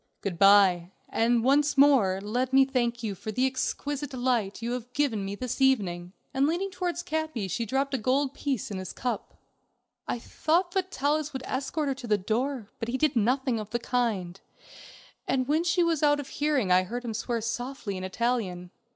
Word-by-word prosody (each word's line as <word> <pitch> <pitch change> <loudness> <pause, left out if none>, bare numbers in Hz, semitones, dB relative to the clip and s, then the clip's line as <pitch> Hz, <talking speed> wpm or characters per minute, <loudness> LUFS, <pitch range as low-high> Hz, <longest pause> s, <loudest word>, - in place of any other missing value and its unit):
"Good 180 -4 -4
by, 195 -3 +6 0.2
and 230 0 +2
once 285 +3 +3
more 260 -10 +5
let 250 +5 -1
me 270 0 +7
thank 240 -3 -1
you 210 -3 -2
for 215 +3 -6
the 250 +5 +1
exquisite 280 +2 -2
delight 245 -6 -1
you 235 - -2
have 245 0 -5
given 250 -8 0
me 195 +1 -4
this 255 +4 -4
evening." 185 -9 +1 0.2
And 270 +2 +2
leaning 365 +5 -1
towards 355 -1 -3
Capi 315 - -2
she 230 +5 -2
dropped 275 +4 0
a 265 - +1
gold 265 +4 +1
piece 270 -9 -3
in 195 - -3
his 185 - -6
cup. 250 -1 -4 0.7
I - - -1
thought 335 +9 0
that 380 0 0
Vitalis 295 0 0
would 265 - -5
escort 280 +3 -2
her 275 - +1
to 260 -2 -9
the 210 -2 +3
door, 225 +3 -2
but 225 - -3
he 255 - -1
did 305 -1 +1
nothing 245 +2 +1
of 210 -1 -6
the 235 - -1
kind, 220 -7 -1 0.9
and 255 -1 0
when 310 +3 +2
she 350 +1 +2
was 330 -3 +1
out 290 -1 +4
of 285 - -6
hearing 290 -10 0
I 180 0 +6
heard 240 +7 -5
him 230 - -3
swear 235 +1 -2
softly 230 -1 -4
in 185 - -5
Italian. 185 -4 -2
250 Hz, 195 wpm, -27 LUFS, 215-280 Hz, 0.9 s, me